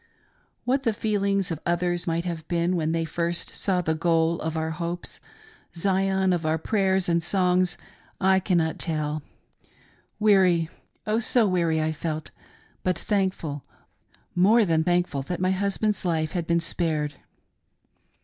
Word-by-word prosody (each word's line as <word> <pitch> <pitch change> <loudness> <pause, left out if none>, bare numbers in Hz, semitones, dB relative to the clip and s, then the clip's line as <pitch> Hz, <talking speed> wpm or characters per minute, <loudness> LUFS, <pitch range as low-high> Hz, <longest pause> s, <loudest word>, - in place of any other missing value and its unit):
" - - -41
What 265 +2 +2
the 230 -4 +1
feelings 200 -3 0
of 160 - -3
others 175 +1 0
might 165 +1 0
have 165 -3 -4
been 175 +1 +1
when 160 -2 0
they 165 0 0
first 170 +1 -2
saw 185 -3 0
the 160 -2 0
goal 165 0 +1
of 160 0 -3
our 160 0 -1
hopes 170 +2 -5 0.3
— 435 - -23
Zion 190 +1 +2
of 170 -2 -1
our 155 +1 +1
prayers 190 +1 +1
and 170 -1 +2
songs 180 0 +1 0.2
— - - -32
I 190 - +4
cannot 170 -4 0
tell. 155 -2 -1 1.0
Weary, 185 -6 +4 0.4
Oh, 215 +1 +1
so 235 -1 +3
weary 170 -4 +1
I 160 - 0
felt, 155 0 -4 0.5
but 180 -2 0
thank 195 0 0
ful, 145 -3 -6 0.7
more 210 +6 +5
than 160 -3 +2
thankful 175 -4 +1
that 175 +5 -4
my 185 +1 +2
husband's 200 +2 0
life 160 -3 0
had 170 -2 -3
been 170 0 +2
spared. 160 -3 -1
175 Hz, 160 wpm, -25 LUFS, 160-190 Hz, 1.0 s, more